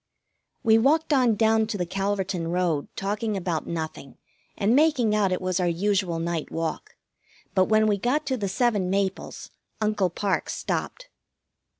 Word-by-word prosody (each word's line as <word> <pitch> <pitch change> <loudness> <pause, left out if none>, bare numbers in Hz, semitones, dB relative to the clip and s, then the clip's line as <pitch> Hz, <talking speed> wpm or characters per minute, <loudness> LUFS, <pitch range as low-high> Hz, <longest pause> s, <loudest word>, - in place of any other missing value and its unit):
We 225 -2 +5
walked 305 +6 +2
on 250 -5 +4
down 220 0 +3
to 215 - -3
the 180 - -1
Calverton 195 -2 -2
road, 170 -4 0
talking 205 +2 -2
about 175 -4 -2
nothing, 160 -4 -5 0.4
and 210 +4 +2
making 275 -7 +3
out 205 -3 +2
it 185 - 0
was 185 0 -1
our 180 - +1
usual 185 0 0
night 165 -1 -3
walk, 165 -1 -4 0.6
but 185 -1 +4
when 215 +1 +3
we 205 -2 +1
got 255 +8 0
to 260 - -1
the 200 -4 -2
seven 205 -3 +1
maples 195 0 -2 0.3
Uncle 210 -4 +1
Parke 195 +3 -1
stopped. - - -4
200 Hz, 160 wpm, -25 LUFS, 180-220 Hz, 0.6 s, We